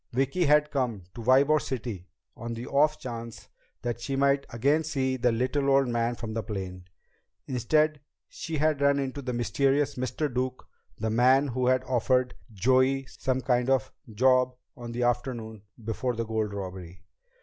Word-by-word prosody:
Vicki 135 +7 +1
had 150 0 +4
come 120 -8 -1
to 120 - -8
Ybor 135 +5 +4
City 110 -8 -5 0.3
on 115 0 -5
the 115 +2 -6
off 150 +2 +2
chance 115 -2 -7 0.3
that 120 -1 -3
she 135 +3 -3
might 140 0 +2
again 140 +7 +1
see 135 -4 -1
the 125 -1 +2
little 130 +4 0
old 135 -1 +4
man 120 0 0
from 115 -2 -6
the 115 - -1
plane. 95 -3 -6 0.6
Instead, 150 +5 +1 0.3
she 165 -2 -5
had 150 -1 +1
run 140 0 +4
into 140 0 -3
the 130 -2 -3
mysterious 135 +4 +1
Mr. 130 +4 -1
Duke, 130 -1 -3 0.3
the 110 0 -2
man 130 +5 +4
who 125 0 -1
had 130 0 +3
offered 125 0 +1 0.2
Joey 130 +5 +2
some 130 -1 -2
kind 125 0 +1
of 135 0 +1 0.2
"job" 130 +3 +3 0.2
on 120 -1 -8
the 120 +1 -2
afternoon 120 -3 -2 0.2
before 120 +2 -2
the 115 0 -2
gold 110 -1 -2
robbery. 90 -3 -7
125 Hz, 165 wpm, -27 LUFS, 115-135 Hz, 0.6 s, had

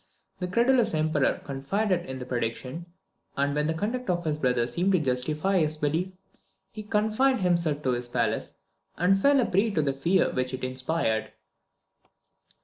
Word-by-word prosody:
The 180 - -2
credulous 235 +1 +3
Emperor 155 -2 +1
confided 175 +7 -1
in 130 0 -5
the 125 - -6
prediction, 125 +6 -4 0.5
and 140 +1 +1
when 150 +1 0
the 160 - 0
conduct 230 +8 -3
of 175 -1 0
his 155 -2 -2
brother 125 -4 +1
seemed 175 +11 0
to 185 - +4
justify 150 +7 0
his 155 -1 0
belief, 160 +5 -1 0.6
he 215 - -7
confined 215 +4 +1
himself 170 -5 +1
to 130 - +1
his 120 0 -2
palace, 115 -3 -1 0.4
and 195 +3 +3
fell 280 +3 +5
a 250 - +3
prey 200 +5 +2
to 170 -7 0
the 140 -1 0
fear 165 +8 +2
which 130 0 -1
it 130 - -10
inspired. 130 -2 -1
155 Hz, 165 wpm, -27 LUFS, 130-195 Hz, 0.6 s, fell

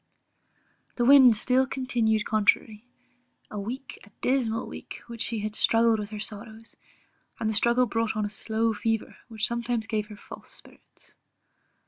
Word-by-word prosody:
The 240 - +1
wind 260 -3 +8
still 255 +4 +2
continued 235 -5 0
contrary; 215 +1 +1 0.6
a 210 - -4
week, 245 +7 -6
a 200 - -16
dismal 245 -4 0
week, - - -9
had 235 -1 -8
she 215 -2 -2
struggled 225 0 +3
with 205 -1 -5
her 215 -1 -7
sorrows; 220 +2 -8 0.6
and 225 - -1
the 220 - 0
struggle 235 +3 +3
brought 225 -1 -1
on 210 - 0
a - - -3
slow 220 +2 -1
fever, 225 +1 -2
which 220 -3 -1
sometimes 235 -1 -2
gave 215 -2 -2
her 210 -1 -11
false - - -12
spirits. - - -15
225 Hz, 150 wpm, -27 LUFS, 215-235 Hz, 0.6 s, wind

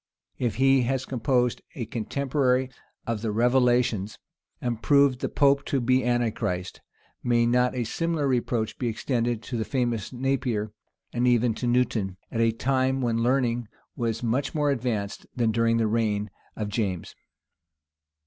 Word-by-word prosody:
If 120 -5 0
he 135 +2 +4
has 130 -1 -1
composed 125 -2 0
a 120 - -3
commentary 130 +2 0 0.3
on 115 -1 -1
the 110 0 -2
Revelations, 120 -3 +2 0.4
and 120 -2 -3
proved 140 -3 +4
the - - -2
pope 140 -1 +3
to 140 - 0
be 130 +2 +2
Antichrist; 115 -6 -1 0.4
may 120 -1 +2
not 125 +1 +2
a 125 - 0
similar 160 +4 -1
reproach 120 -3 -1
be 125 - -1
extended 120 0 -1
to 125 - -4
the 110 - 0
famous 120 -5 -1
Napier; 125 -5 -1 0.4
and 125 +1 +1
even 120 -1 +3
to 120 - -3
Newton, 115 -6 +1
at 115 - -1
a 115 0 +4
time 130 +3 0
when 115 -2 0
learning 120 -2 +1 0.3
was 115 -1 -2
much 125 +7 -1
more 145 -2 +2
advanced 115 -6 -3
than 115 -3 +2
during 115 +1 +2
the 115 - +2
reign 105 -2 0 0.2
of 105 -1 -3
James? 100 -5 -2
120 Hz, 150 wpm, -26 LUFS, 115-130 Hz, 0.4 s, he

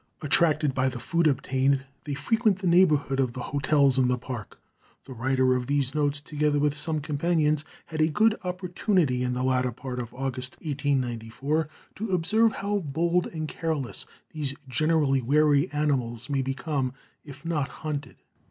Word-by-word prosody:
Attracted 150 -1 +3
by 130 0 +1
the 125 - -6
food 165 +7 +1
obtained, 135 0 +1 0.2
they 145 -2 -3
frequent 220 - +2
the 195 - -6
neighborhood 155 -6 +4
of 130 -3 +1
the 130 - -6
hotels 140 -2 +3
in 130 - +4
the 125 0 +1
Park. 120 -3 -7 0.5
The 130 - -8
writer 130 +1 +2
of 125 -1 -1
these 140 -2 0
notes, 145 -1 0
together 150 0 0
with 145 0 +1
some 155 0 -2
companions, 150 0 +1 0.2
had 160 -2 -3
a 155 - +5
good 215 +8 +3
opportunity, 180 - 0
in 125 0 -1
the 125 - -1
latter 130 -1 +1
part 125 +1 -6
of 120 -2 -5
August, 130 -1 -3
1894, 140 0 -1 0.3
to 220 +1 -3
observe 215 +7 +3
how 205 +1 -1
bold 170 +2 0
and 155 -2 -4
careless 155 -6 -3 0.2
these 145 -3 -3
generally 145 0 +2
wary 145 +2 +3
animals 135 -4 -1
may 135 -1 +1
become 135 0 -2 0.3
if 145 +1 -12
not 155 -5 0
hunted. 145 -4 -5
145 Hz, 160 wpm, -27 LUFS, 130-160 Hz, 0.5 s, a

